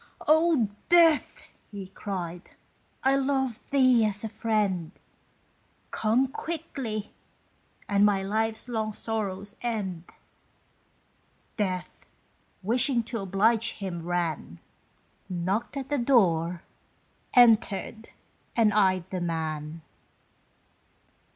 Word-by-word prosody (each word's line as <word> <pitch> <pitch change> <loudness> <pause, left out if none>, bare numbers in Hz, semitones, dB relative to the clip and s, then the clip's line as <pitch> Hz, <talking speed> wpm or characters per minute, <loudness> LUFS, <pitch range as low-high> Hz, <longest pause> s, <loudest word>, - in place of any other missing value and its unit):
"Oh, 315 -6 +4 0.2
Death!" 335 -3 +4 0.2
he 200 -3 -7
cried. 180 -3 -6 0.5
"I 265 +1 +4
love 265 -3 -1
thee 255 -4 +4
as 210 -1 -1
a 220 - -3
friend! 210 -6 -1 1.0
Come 230 +5 +2
quickly, 265 -8 -5 0.7
and 200 0 +3
my 200 -2 +3
life's 220 +3 -1
long 220 -3 -2
sorrows 205 -3 -4
end!" 195 -8 -3 1.5
Death, 185 -4 -3 0.6
wishing 240 +3 +1
to 230 0 -4
oblige 205 +4 +2
him, 185 -4 -5
ran, 165 - -3 0.7
Knocked 190 +9 -2
at 270 -1 -5
the 290 -1 0
door, 180 -9 +2 0.7
entered, 225 -2 +3 0.5
and 220 -3 +4
eyed 185 -4 +2
the 185 -2 -3
man. 160 -2 -3
215 Hz, 95 wpm, -27 LUFS, 185-240 Hz, 1.5 s, Oh